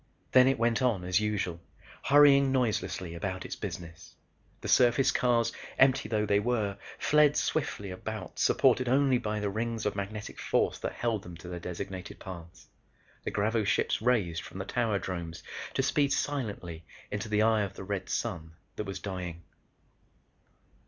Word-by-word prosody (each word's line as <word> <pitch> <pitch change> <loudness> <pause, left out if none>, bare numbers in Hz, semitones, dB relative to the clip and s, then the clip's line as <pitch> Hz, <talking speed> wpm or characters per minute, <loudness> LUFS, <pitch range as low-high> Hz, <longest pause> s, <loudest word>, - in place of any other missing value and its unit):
Then 130 0 +7
it 135 0 +3
went 115 +2 +1
on 115 -8 +1
as 90 +1 +2
usual, 105 -5 -1 0.5
hurrying 140 -1 +6
noiselessly 95 -8 -1
about 95 +2 -4
its - - -5
business. 85 -4 -8 0.5
The - - -5
surface 125 +2 +4
cars, 120 -2 +2 0.2
empty 130 0 +4
though 105 -1 +1
they 100 0 +3
were, 105 -3 -1 0.2
fled 150 -1 +4
swiftly 105 -10 -1
about 105 +2 -6
supported 130 -1 +3
only 135 -1 +4
by 105 -1 -2
the 105 -1 -1
rings 115 +1 -2
of 105 - 0
magnetic 105 +1 -5
force - - +1
that - - -3
held 115 -4 -1
them 85 -2 -10
to 85 - -11
their 90 0 -5
designated 90 +1 -6
paths. 85 -3 -10 0.6
The - - 0
gravoships 105 0 +1
raised 110 -9 +1
from - - -10
the - - -4
tower 115 -4 0
dromes 85 -4 -5 0.3
to - - +2
speed 140 -1 +2
silently 100 - -2 0.3
into 105 +2 -3
the 105 0 +3
eye 110 -1 +4
of 100 -3 -3
the - - -7
red 100 0 -4
sun 80 -1 -3 0.2
that 105 - -3
was 95 0 -5
dying. 90 -3 -5
105 Hz, 160 wpm, -30 LUFS, 90-120 Hz, 0.6 s, Then